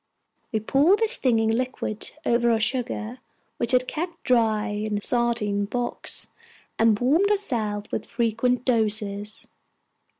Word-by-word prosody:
We 220 - 0
poured 280 - +3
the 450 +1 +1
stinging 235 - +2
liquid 235 -3 -2 0.2
over 235 0 +2
our 225 -1 +2
sugar, 240 0 -2 0.4
which 235 0 +1
had 255 0 +2
kept 340 +2 -5
dry 225 -3 +2
in 210 0 -2
a - - -4
sardine 235 -4 0
box, 240 +3 0 0.5
and 225 -2 +4
warmed 315 +11 +3
ourselves 220 - -2
with - - -3
frequent 240 +2 0
doses. 210 -3 +1
235 Hz, 130 wpm, -24 LUFS, 215-255 Hz, 0.5 s, and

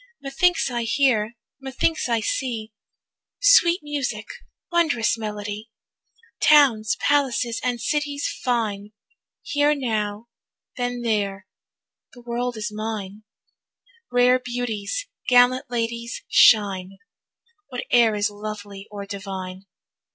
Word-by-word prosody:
Methinks 280 +2 +1
I 240 -1 -1
hear, 230 -2 +1 0.2
methinks 270 +2 -1
I 230 -1 +1
see, 220 -1 -3 0.7
Sweet 470 -9 +5
music, 270 -7 -3 0.5
wondrous 305 -11 +2
melody, 210 0 -6 0.7
Towns, 260 -8 +5
palaces, 255 -5 +1
and 245 -1 -1
cities 290 +3 -1 0.2
fine; 215 -5 -1 0.5
Here 290 +1 +2
now, 215 -5 -2 0.5
then 245 -1 -3
there; 200 -4 -1 0.7
the 245 - -14
world 240 0 -3
is 215 +1 -4
mine, 215 -1 -5 0.9
Rare 250 +1 +4
beauties, 245 - -3 0.2
gallant 250 +1 +4
ladies 235 0 -3
shine, 195 -3 +4 0.7
Whate'er 240 -3 +2
is 205 0 0
lovely 205 -1 -8
or 205 -1 -7
divine. 195 -1 -7
235 Hz, 100 wpm, -23 LUFS, 210-255 Hz, 0.9 s, Sweet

